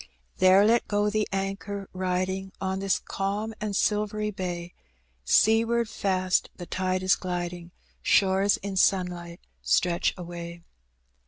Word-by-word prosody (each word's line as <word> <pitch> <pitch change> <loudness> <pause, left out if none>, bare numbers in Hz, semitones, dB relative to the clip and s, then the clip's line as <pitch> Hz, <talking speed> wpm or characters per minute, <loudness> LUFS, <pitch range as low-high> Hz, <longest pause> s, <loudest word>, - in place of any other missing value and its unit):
There 185 +2 +6
let 230 +2 +3
go 205 0 +1
the 215 0 0
anchor. 195 0 -3
Biding, 185 +1 -2
On 190 0 -2
this 195 0 +1
calm 205 +3 -3
and 210 -2 -2
silvery 210 +1 0
bay, 175 -2 -5 0.5
Seaward 225 - +3
fast 185 -4 0
the 175 - -7
tide 185 +1 -1
is 185 - +4
gliding, 175 -1 -4 0.3
Shores 195 0 +3
in 200 -1 -4
sunlight 180 -2 +1 0.2
stretch 80 - +1
away. 170 -1 -8
190 Hz, 120 wpm, -26 LUFS, 180-205 Hz, 0.5 s, There